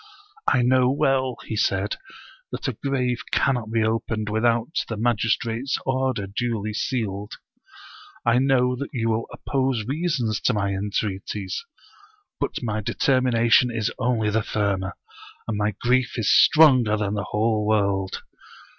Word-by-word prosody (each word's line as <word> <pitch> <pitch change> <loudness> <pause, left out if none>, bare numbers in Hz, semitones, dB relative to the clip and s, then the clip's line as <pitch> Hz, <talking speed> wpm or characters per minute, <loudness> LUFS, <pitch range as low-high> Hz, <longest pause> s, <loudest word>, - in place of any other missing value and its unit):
" 415 +1 -27
I 125 - +3
know 125 0 +4
well," 135 -3 +1
he 110 - -4
said, 100 -1 0 0.3
" - - -24
that - - -4
a - - -1
grave 125 -3 -1
cannot 125 -5 +1
be 115 -1 +2
opened 110 -1 -1
without 115 +7 +1
the 115 - -3
magistrate's 115 +2 0
order 130 -5 0
duly 110 +1 -3
sealed; 105 -4 -3 0.9
I 120 +1 +4
know 130 -2 +2
that 140 - -5
you 115 -3 -1
will 110 +1 -1
oppose 130 -5 -1
reasons 135 - -1
to 125 - +1
my 100 -1 0
entreaties; 100 - -3 0.8
but - - -3
my 110 -2 -2
determination 125 0 +3
is 115 -2 -1
only 115 -4 +1
the 110 +1 +1
firmer, 100 -3 -1 0.5
and 115 - -2
my 105 -1 -1
grief 125 0 +1
is 115 - +2
stronger 130 -9 +6
than 105 -1 -1
the 105 - -2
whole 105 0 0
world. 100 -3 0
115 Hz, 145 wpm, -24 LUFS, 105-130 Hz, 0.9 s, stronger